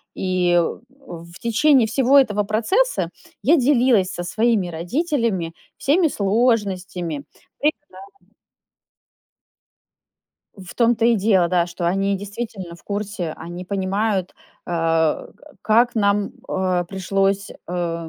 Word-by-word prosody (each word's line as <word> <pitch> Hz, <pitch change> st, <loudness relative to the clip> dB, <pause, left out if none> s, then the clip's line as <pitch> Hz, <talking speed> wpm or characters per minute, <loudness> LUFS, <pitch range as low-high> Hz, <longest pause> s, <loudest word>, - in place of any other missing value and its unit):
И 180 Hz, -2 st, +1 dB
в 240 Hz, -1 st, -6 dB
в -, -, -13 dB
течение 255 Hz, +1 st, +3 dB
всего 265 Hz, +4 st, +3 dB
этого 210 Hz, -6 st, +1 dB
процесса 230 Hz, -, +1 dB, 0.3 s
я 290 Hz, +10 st, +5 dB
делилась 245 Hz, -7 st, +3 dB
со 175 Hz, -, -5 dB
своими 215 Hz, +1 st, +1 dB
родителями 195 Hz, -, -1 dB, 0.2 s
всеми 325 Hz, +5 st, +2 dB
сложностями, 195 Hz, -, 0 dB, 0.4 s
препятс 295 Hz, 0 st, -1 dB, 2.7 s
В 185 Hz, -3 st, -11 dB
том-то 235 Hz, -1 st, +2 dB
и 235 Hz, 0 st, +5 dB
дело, 195 Hz, -4 st, +3 dB
да, 175 Hz, -1 st, +2 dB
что 175 Hz, 0 st, -4 dB
они 195 Hz, +3 st, +1 dB
действительно 200 Hz, -3 st, -7 dB
в 170 Hz, -, -17 dB
курсе, 200 Hz, -5 st, -4 dB
они 175 Hz, +2 st, -8 dB
понимают, 195 Hz, 0 st, -1 dB, 0.3 s
а, 165 Hz, -2 st, 0 dB
э, -, -, -19 dB, 0.3 s
как 235 Hz, +3 st, +3 dB
нам, 200 Hz, -2 st, +1 dB, 0.2 s
а, 185 Hz, -2 st, 0 dB
пришлось, 195 Hz, +2 st, -1 dB, 0.2 s
э, 170 Hz, -2 st, -3 dB
200 Hz, 115 wpm, -21 LUFS, 175-235 Hz, 2.7 s, я